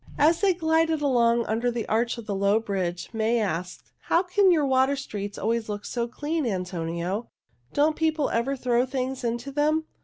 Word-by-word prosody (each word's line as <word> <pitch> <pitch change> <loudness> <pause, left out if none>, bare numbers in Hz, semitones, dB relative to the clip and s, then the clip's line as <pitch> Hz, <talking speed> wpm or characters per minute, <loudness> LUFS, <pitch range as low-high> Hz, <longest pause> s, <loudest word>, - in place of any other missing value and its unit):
As 320 +3 +4
they 390 -3 +3
glided 320 -2 +1
along 235 -3 +3
under 230 +3 0
the 235 -2 -3
arch 235 +2 0
of 230 -2 -9
a 205 - -1
low 200 +2 +2
bridge, 185 -5 -3
May 225 +1 +1
asked, 180 -4 -4
"How 340 - +3
can 380 +1 +3
your 310 -4 +3
water 265 +1 +3
streets 205 -7 -6
always 225 0 -1
look 205 -1 -4
so 235 -1 -2
clean, 300 +6 -2
Antonio? 180 +1 -3 0.4
Don't 305 +2 +3
people 315 -3 0
ever 235 +4 0
throw 250 -1 +1
things 260 0 -3
into 240 +3 -2
them?" 305 +3 +1
240 Hz, 180 wpm, -26 LUFS, 210-295 Hz, 0.4 s, As